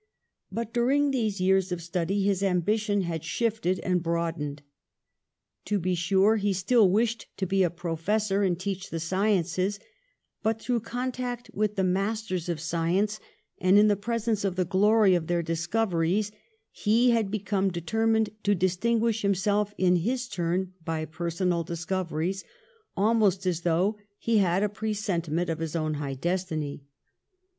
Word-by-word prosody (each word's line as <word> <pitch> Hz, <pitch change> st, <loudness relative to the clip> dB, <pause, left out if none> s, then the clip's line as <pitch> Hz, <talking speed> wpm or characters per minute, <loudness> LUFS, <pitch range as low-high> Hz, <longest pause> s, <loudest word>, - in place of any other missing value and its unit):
But 230 Hz, +2 st, -4 dB
during 275 Hz, +4 st, +2 dB
these 220 Hz, -6 st, -1 dB
years 190 Hz, 0 st, +2 dB
of 180 Hz, -, -2 dB
study 175 Hz, +3 st, -1 dB
his 195 Hz, -1 st, +1 dB
ambition 205 Hz, +2 st, +1 dB
had 170 Hz, -3 st, -3 dB
shifted 200 Hz, +1 st, 0 dB
and 180 Hz, -1 st, 0 dB
broadened. 165 Hz, -4 st, -2 dB, 1.0 s
To 210 Hz, -, 0 dB
be 185 Hz, 0 st, 0 dB
sure, 190 Hz, +5 st, +3 dB
he 205 Hz, -1 st, +1 dB
still 200 Hz, +3 st, +4 dB
wished 225 Hz, +3 st, 0 dB
to 190 Hz, -, -1 dB
be 195 Hz, +1 st, +1 dB
a 180 Hz, -, +4 dB
professor 180 Hz, +5 st, -1 dB
and 180 Hz, -3 st, +1 dB
teach 195 Hz, 0 st, -4 dB
the 165 Hz, -, -3 dB
sciences; 185 Hz, +2 st, 0 dB, 0.6 s
but 225 Hz, 0 st, 0 dB
through 240 Hz, +1 st, 0 dB
contact 245 Hz, +1 st, -4 dB
with 210 Hz, 0 st, 0 dB
the 190 Hz, -, +1 dB
masters 190 Hz, -1 st, -1 dB
of 170 Hz, -, -1 dB
sci 165 Hz, +1 st, -2 dB
ence, 210 Hz, +1 st, 0 dB, 0.4 s
and 185 Hz, +2 st, +5 dB
in 210 Hz, +1 st, +6 dB
the 205 Hz, -, +3 dB
presence 225 Hz, 0 st, -1 dB
of 195 Hz, -3 st, -1 dB
the 185 Hz, -1 st, +1 dB
glory 205 Hz, +2 st, +4 dB
of 170 Hz, -3 st, 0 dB
their 175 Hz, -1 st, 0 dB
discoveries, 175 Hz, +3 st, 0 dB, 0.4 s
he 230 Hz, +4 st, +3 dB
had 225 Hz, -4 st, +1 dB
become 200 Hz, -1 st, 0 dB
determined 220 Hz, +5 st, 0 dB
to 205 Hz, 0 st, +2 dB
dis 180 Hz, 0 st, 0 dB
tinguish 230 Hz, +1 st, +1 dB
himself 205 Hz, +1 st, +1 dB
in 180 Hz, -1 st, +3 dB
his 245 Hz, +8 st, -1 dB
turn 180 Hz, -1 st, -2 dB
by 160 Hz, -1 st, -2 dB
personal 170 Hz, +1 st, -1 dB
discov 175 Hz, +2 st, -3 dB
eries, 175 Hz, +5 st, -2 dB, 0.5 s
almost 200 Hz, -3 st, +2 dB
as 175 Hz, -2 st, 0 dB
though 180 Hz, +5 st, +1 dB, 0.2 s
he 230 Hz, -2 st, +2 dB
had 185 Hz, 0 st, +2 dB
a -, -, +3 dB
presentiment 195 Hz, -6 st, -2 dB
of 165 Hz, -1 st, -2 dB
his 165 Hz, 0 st, -4 dB
own 155 Hz, -1 st, 0 dB
high 145 Hz, -2 st, -3 dB
destiny. 155 Hz, -3 st, -3 dB
190 Hz, 155 wpm, -27 LUFS, 175-215 Hz, 1.0 s, in